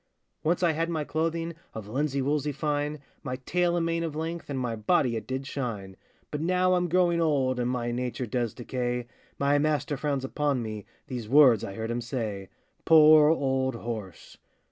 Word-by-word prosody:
Once 170 +3 +1
I 170 - +4
had 165 +2 -1
my 160 -3 -1
clothing 165 +2 -2 0.2
Of 110 -2 -6
linsey 140 +3 -1
woolsey 150 +1 0
fine, 145 0 -2 0.2
My 125 -1 -4
tail 175 0 +1
and 165 - 0
mane 165 0 0
of 160 -3 -4
length, 165 +1 -4
And 140 - -3
my 125 -3 -2
body 115 +3 +1
it 110 -1 -5
did 130 +1 -3
shine; 110 -9 -5 0.4
But 150 - -3
now 185 +2 +2
I'm 180 -1 +1
growing 175 -1 +3
old, 135 -5 +1
And 120 0 0
my 120 -1 -1
nature 125 +1 -3
does 120 -1 -2
decay, 125 0 -3 0.3
My 140 +1 +2
master 145 -1 0
frowns 140 -1 -1
upon 140 -2 -1
me, 110 -2 -6 0.2
These 120 -4 -6
words 130 -5 +6
I 95 - -5
heard 110 +2 -3
him 120 +1 -2
say,— 110 -5 -4 0.3
Poor 155 -1 +7
old 130 -4 +1
horse! 110 -6 -7
140 Hz, 185 wpm, -27 LUFS, 120-155 Hz, 0.4 s, Poor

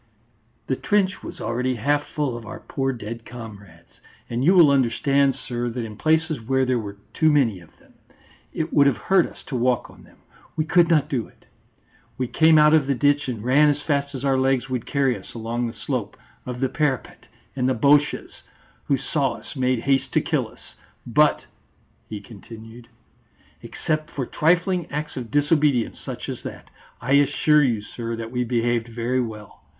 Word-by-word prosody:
"The - - -1
trench 200 -3 0
was - - -9
already 125 +3 -1
half 145 +6 0
full 145 -6 -2
of 120 - -7
our 110 - -8
poor 135 0 -2
dead 115 -1 -7
comrades. 110 -5 -12 0.3
And 120 +2 -1
you 180 +6 +5
will 165 -6 +7
understand, 135 +1 +2
sir, 120 -2 -4
that 120 0 -4
in 110 -1 -8
places 160 +1 +1
where 130 +3 +1
there 125 -1 +1
were 100 -2 -7 0.2
too 155 -1 +3
many 120 -10 +2
of 85 - -19
them, - - -24 0.6
it 160 0 -3
would 140 -1 +5
have 135 - +2
hurt 190 -3 +2
us - - -15
to 135 - -6
walk 125 0 0
on - - -17
them; - - -20 0.4
we 155 - 0
could 170 +1 +4
not 155 -4 +3
do 125 -5 -2
it. - - -25 0.7
We 130 - -1
came 160 +4 +4
out 150 0 +6
of 155 -4 +4
the 140 - +1
ditch, 145 +2 +2
and 115 -4 -5
ran 145 +5 +4
as 145 0 -1
fast 140 -1 -1
as 135 +1 -5
our 135 -1 +2
legs 135 -1 +1
would 125 -3 -3
carry 135 -3 +1
us - - -12
along 115 +1 -2
the 115 - -6
slope 120 -7 -4 0.3
of 125 0 -5
the 135 - +2
parapet, 135 -2 -2 0.3
and 130 -1 +1
the 130 - +1
Boches 145 +5 +2 0.4
who 140 - +2
saw 135 +1 -1
us - - -11
made 130 -3 0
haste 135 +1 +1
to - - +4
kill - - -1
us. - - -19 0.3
But," - - +2 0.6
he 105 -2 -6
continued, 115 +2 -12 0.7
"except 155 0 -3
for 135 -5 -4
trifling 175 +3 +1
acts 150 +1 -4
of 125 -4 -6
disobedience 145 -4 +2
such - - -7
as - - -5
that, - - -9 0.3
I 125 +3 -4
assure 150 +1 +4
you, 115 -6 0
sir, 115 +1 -5
that 115 0 -6
we 125 0 -1
behaved 120 -1 0
very 120 +2 -1
well. 110 -3 -8
130 Hz, 190 wpm, -23 LUFS, 120-145 Hz, 0.7 s, will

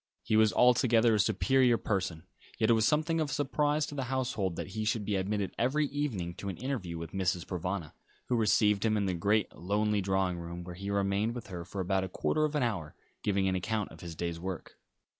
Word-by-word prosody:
He 110 - +1
was 110 -1 +5
altogether 120 -2 +4
a 105 - +2
superior 120 +4 +3
person, 95 -7 -2 0.3
yet 110 +1 +3
it - - +7
was 110 -1 +3
something 160 +2 +2
of 150 - -1
a - - -3
surprise 150 +1 +1
to - - -8
the 135 -2 -2
household 120 -8 -1
that - - -5
he 110 +3 -3
should 110 -1 0
be 105 - 0
admitted 100 +1 -1
every 140 +6 +2
evening 120 -12 -2
to 100 - -4
an 90 - -5
interview 110 -9 -3
with 80 0 -6
Mrs. 90 -3 -1
Provana, 90 -2 -3 0.3
who 125 - 0
received 105 -2 +3
him 110 -1 +2
in 100 - +1
the 95 - 0
great, 100 +4 +1
lonely 105 +3 0
drawing 95 -2 0
room, 85 +1 -6
where 90 0 -7
he 100 +3 -6
remained 100 +3 0
with 120 - -7
her 90 -2 -5
for 95 +2 -5
about 95 +1 +1
a 95 - -4
quarter 155 +10 +1
of 150 0 -2
an 145 - +2
hour, 95 -11 -2 0.3
giving 100 -2 +1
an 95 - +1
account 105 +3 -2
of - - -13
his 85 -2 -7
day's 85 0 -3
work. 95 0 -6
100 Hz, 225 wpm, -31 LUFS, 95-120 Hz, 0.3 s, it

